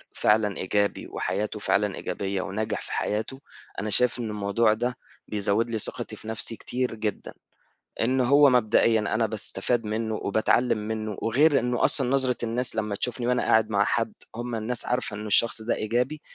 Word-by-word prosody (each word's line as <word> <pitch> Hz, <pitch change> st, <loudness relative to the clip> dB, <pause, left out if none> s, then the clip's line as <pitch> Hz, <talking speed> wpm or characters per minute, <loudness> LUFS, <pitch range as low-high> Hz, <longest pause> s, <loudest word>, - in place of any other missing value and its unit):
فعلًا 105 Hz, -2 st, +2 dB
إيجابي 100 Hz, +2 st, -1 dB
وحياته 105 Hz, +3 st, -3 dB
فعلًا 100 Hz, -1 st, +1 dB
إيجابية 95 Hz, +1 st, -3 dB
وناجح 105 Hz, +3 st, -3 dB
في -, -, -9 dB
حياته، 110 Hz, +5 st, -2 dB, 0.4 s
أنا 105 Hz, +2 st, -3 dB
شايف 125 Hz, +4 st, +2 dB
إن 115 Hz, -, -3 dB
الموضوع 105 Hz, +1 st, +1 dB
ده 120 Hz, +3 st, -2 dB, 0.3 s
بيزوّد 105 Hz, +2 st, 0 dB
لي 110 Hz, -, -2 dB
ثقتي -, -, -3 dB
في -, -, -12 dB
نفْسي 110 Hz, +1 st, 0 dB
كتير 125 Hz, 0 st, -3 dB
جدًا، 110 Hz, -1 st, -4 dB, 0.7 s
إن 130 Hz, +3 st, +2 dB
هو 140 Hz, +3 st, +6 dB
مبدئيًا 115 Hz, -2 st, +3 dB
أنا 110 Hz, +2 st, 0 dB
باستفاد 110 Hz, +2 st, -1 dB
منه 110 Hz, +1 st, -2 dB
وباتعلّم 110 Hz, +3 st, +1 dB
منه 110 Hz, 0 st, -4 dB
وغير 140 Hz, +6 st, +3 dB
إنه 125 Hz, 0 st, -1 dB
أصلًا 130 Hz, -3 st, +3 dB
نظرة 130 Hz, -2 st, +1 dB
الناس 120 Hz, +2 st, -1 dB
لمّا 105 Hz, -2 st, -1 dB
تشوفني 120 Hz, +2 st, -2 dB
وأنا 125 Hz, 0 st, +1 dB
قاعد 110 Hz, -1 st, +3 dB
مع 100 Hz, -1 st, +2 dB
حد 220 Hz, -, 0 dB, 0.2 s
هُم 120 Hz, 0 st, -4 dB
الناس 115 Hz, +2 st, -2 dB
عارفة 125 Hz, -4 st, -2 dB
إنه 105 Hz, +1 st, -6 dB
الشخص 110 Hz, +1 st, +4 dB
ده 115 Hz, -, -1 dB
إيجابي، 125 Hz, +7 st, -1 dB
110 Hz, 170 wpm, -26 LUFS, 105-125 Hz, 0.7 s, هو